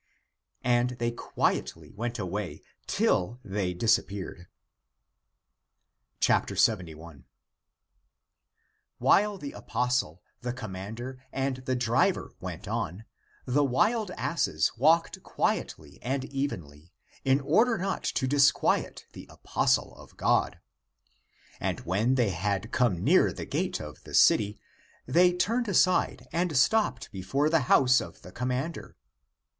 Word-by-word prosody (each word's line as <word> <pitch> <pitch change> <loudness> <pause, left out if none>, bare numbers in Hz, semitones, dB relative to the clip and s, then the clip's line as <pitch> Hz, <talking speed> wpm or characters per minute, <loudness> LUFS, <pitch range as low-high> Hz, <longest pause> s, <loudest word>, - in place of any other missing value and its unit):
And 120 0 +2
they 120 0 -1
quietly 120 - -2
went 120 +3 -4
away, 100 -1 -4 0.2
till 100 +7 +1
they 95 -2 -2
disappeared. 95 -3 -1 1.8
71. 85 - 0 1.7
While 210 0 +3
the 145 -6 -7
apostle, 125 -10 -2 0.2
the 125 0 -3
commander, 115 +3 -7
and 135 -1 -1
the 130 0 -2
driver 120 -1 +1
went - - -7
on, 95 +7 -3 0.4
the 135 +3 +2
wild 205 - +1
asses 170 - 0
walked 160 +7 +2
quietly - - -3
and 130 +2 -2
evenly, 90 - -5 0.3
in 135 +1 +3
order 220 - +3
not 195 +2 -2
to 130 - 0
disquiet 140 +1 +2
the - - -11
apostle - - 0
of - - -16
God. - - +1 1.0
And - - -2
when 105 +9 +1
they 120 -5 +2
had 100 +4 -2
come 110 -9 +1
near - - +4
the - - -7
gate - - -2
of 75 -2 -9
the - - -6
city, 105 0 +4 0.5
they 175 +7 +4
turned 230 +7 0
aside 185 -2 +2
and 170 -4 0
stopped 145 - +2
before 135 +11 -1
the 165 - +4
house 130 -1 +5
of 85 - -10
the 90 - -11
commander. 125 - -4
125 Hz, 115 wpm, -28 LUFS, 100-145 Hz, 1.8 s, house